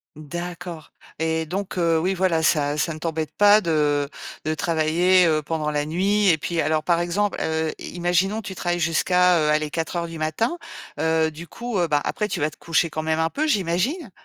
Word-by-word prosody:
D'accord. 175 +2 -7 0.3
Et 160 0 -1
donc, 190 +2 -4
heu, 165 -1 +3
oui, 180 +4 +1
voilà, 180 -3 +1
ça 145 -2 +2
ça 155 +3 0
ne 155 - -9
t'embête 160 -1 -3
pas 205 +1 +6
de 150 -4 +1 0.4
de 155 - 0
travailler, 170 +3 +3
heu, 155 -2 +2
pendant 150 0 -2
la 145 0 -1
nuit 200 +5 +1
et 160 - +4
puis 165 +2 -2
alors 155 +1 0
par 170 +1 +2
exemple, 195 +4 -1
heu, 160 0 -1
i - - -8
imaginons 180 +5 +1
tu 190 - -6
travailles 175 -1 -2
jusqu'à, 180 +2 +3
heu, 150 -1 +1
allez, 150 0 +1
04:00 170 +1 -2
du 165 -1 -8
matin, 160 - -1 0.4
heu, 160 0 +2
du 165 +3 -10
coup, 235 -1 -4
heu, 175 - +2
bah 145 -1 +2
après 210 - -1
tu 190 - -3
vas 150 +1 0
te - - -17
coucher 165 -1 0
quand 155 - -3
même 160 0 0
un 160 0 +1
peu, 310 +2 -1
j'imagine? 210 - 0
165 Hz, 205 wpm, -23 LUFS, 155-180 Hz, 0.4 s, pas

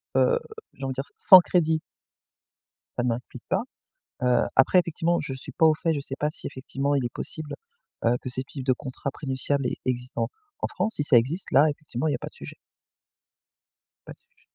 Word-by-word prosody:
heu, 485 -1 +4 0.3
j'ai 135 - -11
envie 135 - -2
de 130 - -5
dire, 135 - -3
s - - -7
sans 185 - +9
crédit 160 -3 +1 1.2
ça 120 - +1
ne 125 - +1
m'implique 120 +1 -5
pas. - - +1 0.6
Heu 125 -1 +3
après 135 +7 +6
effectivement, 170 0 0
je 135 -3 -4
suis 130 - -7
pas 160 - +3
au 155 - +6
fait, 165 -2 +2
je 145 - -2
sais 135 -1 -5
pas 150 - +1
si - - -1
effectivement 140 +2 -2
il 135 - 0
est 120 - -5
possible, 155 -2 -3 0.5
heu, 115 +1 +4
que 130 - -5
ces 130 +1 0
types 135 0 -7
de 130 - +4
contrats 130 +1 -6
prénuptials 135 0 +1
e 125 - 0
existent 125 0 -2
en - - -1 0.3
en - - -1
France. 215 +4 -2
Si 145 - +2
ça 140 -4 +6
existe, 140 +11 0
là 145 +4 +6
effectivement 145 -1 -4
il 150 - +1
y - - +1
a - - -6
pas - - -6
de - - -26
sujet. - - -9 1.5
Pas - - -8
de - - -25
sujet. 475 0 -36
140 Hz, 225 wpm, -26 LUFS, 130-160 Hz, 1.5 s, sans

